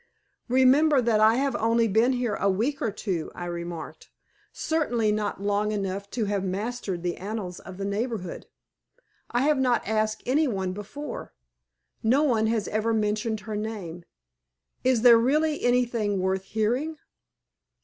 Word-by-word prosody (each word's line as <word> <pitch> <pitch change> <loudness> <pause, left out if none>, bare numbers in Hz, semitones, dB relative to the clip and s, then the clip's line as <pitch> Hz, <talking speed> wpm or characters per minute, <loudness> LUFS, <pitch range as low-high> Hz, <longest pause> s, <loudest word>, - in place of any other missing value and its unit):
"Remember, 260 +4 +5
that 230 -3 +2
I 220 +1 +5
have 275 0 0
only 230 +1 +2
been 225 +5 +3
here 245 -3 -1
a 200 - +1
week 230 +10 0
or - - +1
two," 190 -5 -3
I 175 - -5
remarked; 170 -1 -6 0.4
"certainly 240 -9 0
not 210 -2 -2
long 205 +1 +1
enough 200 -1 -3
to 225 - +1
have 200 -1 -1
mastered 195 -1 -3
the 175 -1 -2
annals 195 -2 -5
of 185 -1 -10
the 195 - -3
neighborhood. 205 -2 -3 0.8
I 245 +2 +1
have 295 -1 +3
not 250 -5 +1
asked 215 0 0
any 290 +5 +2
one 190 -6 -2
before. 240 +8 -7 0.7
No 255 +7 +3
one 225 -7 +2
has 220 -2 0
ever 220 +1 0
mentioned 215 0 -1
her 215 +1 -5
name. 205 -6 -5 0.8
Is 250 -3 +2
there 235 -2 +8
really 300 +5 +1
anything 235 -5 +1
worth 190 +1 -1
hearing?" 245 +10 -1
220 Hz, 150 wpm, -26 LUFS, 200-245 Hz, 0.8 s, there